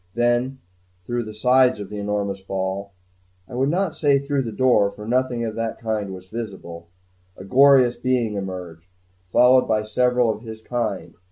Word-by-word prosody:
Then 120 +2 +1 0.5
through 120 +2 -2
the 110 - -8
sides 125 +1 +3
of 100 - -7
the 105 - -5
enormous 100 -1 -2
ball 95 +1 -4 0.6
I - - -13
would 130 +3 +1
not 180 +1 0
say, 145 -3 +3
through 140 0 -1
the 115 -3 -4
door, 115 -4 +3
for 105 +1 -10
nothing 125 -1 0
of 110 - -4
the 115 0 -3
kind 110 -3 -3
was 95 -1 -10
visible 95 -6 -7 0.5
a - - -9
glorious 130 +2 +5
being 125 -4 0
emerged, 90 -4 -6 0.4
followed 125 +7 +5
by 110 -1 +1
several 125 +2 +2
of 110 - -7
his 110 -1 -10
kind. 115 -6 -3
115 Hz, 170 wpm, -22 LUFS, 100-125 Hz, 0.6 s, glorious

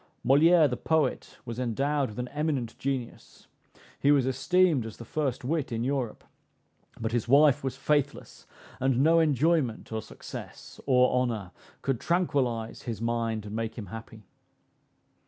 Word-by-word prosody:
Moliere 155 +5 +6
the 125 -2 -3
poet 160 -1 0
was 120 0 -6
endowed 135 +3 0
with 105 - -11
an 125 0 -3
eminent 145 -6 -2
genius 130 -3 -5 0.5
he 140 - +4
was 140 -3 +4
esteemed 155 +2 +2
as 110 -1 -8
the 115 - -9
first 135 -1 -2
wit 150 -1 -1
in 115 0 -2
Europe; 130 -3 -2 0.8
but 110 -1 -2
his 120 -1 -1
wife 140 +1 +5
was 135 -1 -3
faithless, 145 0 -1 0.3
and 130 0 +2
no 165 +2 +5
enjoyment, 150 -6 +1
or 110 0 -2
success, - - -10
or 125 -1 +4
honor 110 -7 -3 0.3
could 135 -4 0
tranquillize 135 -10 -1
his 115 -4 -5
mind, 115 -2 -1
and 105 +1 -6
make 115 0 -3
him 110 - -5
happy. 110 -1 -9
130 Hz, 150 wpm, -28 LUFS, 115-145 Hz, 0.8 s, Moliere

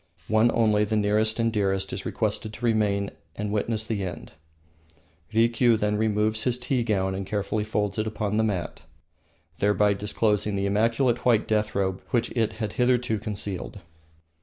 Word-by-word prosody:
One 110 +2 +4
only, 105 -2 +3
the 105 +1 -1
nearest 105 +1 +2
and 115 -1 +1
dearest, 95 -2 0
is - - -4
requested 110 - -2
to 120 - -5
remain 105 -3 +1 0.2
and 105 0 -3
witness 110 +1 -1
the 105 -3 -2
end. 90 -3 -6 1.0
Rikiu 115 +1 +3
then 105 0 0
removes 110 0 +1
his 125 +1 0
tea 125 0 -1
gown 95 -4 0
and 95 +1 -3
carefully 105 +2 -2
folds 105 -1 -2
it 110 - 0
upon 105 -1 -2
the 110 - +3
mat, 95 -6 -2 0.8
thereby 105 0 +3
disclosing 105 0 0
the 100 0 -1
immaculate 115 +4 +1
white 115 -3 +3
death 105 0 0
robe 95 -1 -1
which 120 -3 0
it 115 -3 0
had 105 -2 -4
hitherto 125 -3 +1
concealed. 100 -3 -5
105 Hz, 160 wpm, -26 LUFS, 105-115 Hz, 1.0 s, One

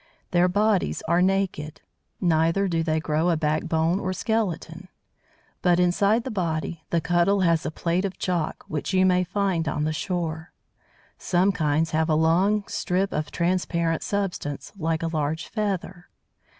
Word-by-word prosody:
Their 175 0 +4
bodies 205 +1 +1
are 170 +2 +3
naked. 185 -5 0 0.4
Neither 165 +3 +2
do 165 -2 0
they 160 -1 0
grow 155 +2 0
a 170 - +2
backbone, 160 +3 0
or 185 -1 -2
skeleton; 185 -5 -2 0.7
but, 180 -1 +3
inside 200 +6 +3
the 260 - -5
body, 165 -4 -2
the 170 - +2
Cuttle 175 +4 +2
has 170 -3 +2
a - - -1
plate 170 +3 -1
of 195 -1 -3
chalk, 175 -4 -2
which 155 +5 -3
you 185 0 +4
may 180 -1 +3
find 185 -3 -1
on 150 0 -1
the 155 +1 0
shore. 160 0 -3 0.7
Some 185 +2 +2
kinds 160 -2 0
have 160 0 +1
a 155 - +3
long 185 +6 +2
strip 190 +2 -1
of 150 0 -2
transparent 170 -2 0
substance, 190 -8 -3
like 165 -3 -1
a - - 0
large 160 0 -2
feather. 195 -4 -3
175 Hz, 155 wpm, -25 LUFS, 160-190 Hz, 0.7 s, Their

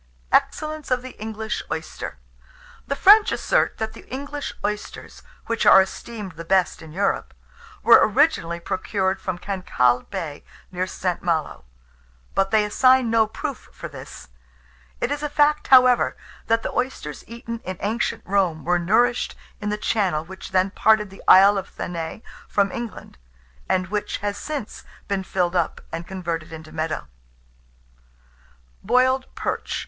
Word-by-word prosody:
EXCELLENCE 310 -1 0
OF 255 -1 +1
THE 255 - -7
ENGLISH 220 0 -4
OYSTER. - - -5 0.7
The 280 - -1
French 415 +7 +7
assert - - +1
that 220 0 -3
the - - -14
English 285 +2 -5
oysters, 210 0 -5 0.2
which 230 -1 -1
are 195 - +8
esteemed 200 +1 -3
the 165 0 -9
best 185 +1 +1
in 160 -1 -11
Europe, 195 +5 -1 0.5
were 235 - +8
originally 215 - +2
procured 190 +2 -1
from 185 -2 -3
Cancalle 175 -11 +1
Bay, 150 -3 -5 0.3
near 185 0 -2
St. 180 -1 -2
Malo; 165 - -2 0.7
but 195 0 +1
they 215 0 +3
assign 255 +2 +4
no 225 -1 +4
proof 280 +5 -6
for - - -8
this. - - -11 0.7
It 250 - -1
is 290 0 -2
a 300 - -2
fact, 295 +1 +2
however, 255 -2 +5 0.3
that 230 0 +2
the - - -3
oysters 245 - -3
eaten 230 0 -7
in 185 -4 -6
ancient 220 +3 -1
Rome 185 -5 0
were 175 +1 +2
nourished 235 +7 +2 0.2
in 210 - -3
the 210 - -1
channel 190 -8 0
which 190 +2 -9
then 190 +1 +2
parted 210 -1 +3
the 195 - -13
Isle 195 +1 +8
of 190 - -8
Thanet 170 +4 -5 0.2
from 200 -1 +1
England, 235 - -7 0.5
and 185 0 +1
which 210 0 -2
has 205 0 -3
since 285 -2 -6 0.2
been 200 -1 -1
filled 180 -1 -1
up, 170 -2 0
and 165 +1 -5
converted 170 -4 -4
into 155 -1 -10
meadows. 155 - -3 1.8
BOILED 255 +4 +3
PERCH. - - -3
205 Hz, 150 wpm, -23 LUFS, 180-240 Hz, 1.8 s, are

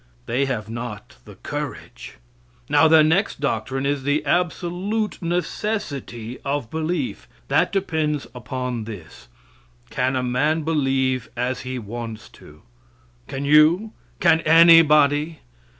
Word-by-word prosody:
They 130 - 0
have 120 -6 -3
not 115 -2 -7
the - - -13
courage. - - -7 0.5
Now, 155 +2 +5
their 160 -1 +6
next 160 +5 +1
doctrine 135 0 -2
is 140 0 0
the 145 +2 0
absolute 180 +6 -1
necessity 165 - -3
of 140 -4 -3
belief. 170 +10 -3 0.2
That - - +2
depends 160 -7 -1
upon 125 -1 -4
this: 100 - -11 0.6
Can 130 +1 0
a 130 - -1
man 145 +6 0
believe 135 -5 0
as 125 +2 -1
he 130 0 -5
wants 115 0 -7
to? 75 +1 -17 0.6
Can 135 +1 -5
you? 155 +9 +4 0.3
Can 160 - +4
anybody? 155 -2 +5
140 Hz, 120 wpm, -22 LUFS, 125-160 Hz, 0.6 s, their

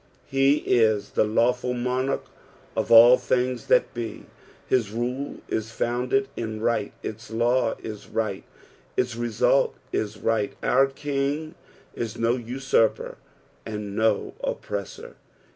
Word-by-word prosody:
Heis 125 -6 +3
the - - +3
lawful 125 +3 +1
monarch 125 +2 -1 0.5
of - - -1
all 120 +2 +9
things 125 -1 -1
that - - +3
be, 120 -2 -6 0.4
Hisruleis 120 -1 -2
founded 125 +3 0
in 110 -2 -4
right, 110 -2 0
its 110 +1 -6
law 120 +1 +1
is 105 -2 -7
right, 110 -4 -2 0.5
its 125 -2 0
result 120 -2 +2 0.2
is 105 0 -2
right. 110 -2 0
Our 135 +2 +4
King 145 +3 -2 0.4
is 115 0 -4
no 115 +1 +2
usurper 120 -2 0 0.4
and 105 -2 -5
no 110 -1 +1
oppressor. 100 -2 -5
120 Hz, 110 wpm, -25 LUFS, 110-125 Hz, 0.5 s, all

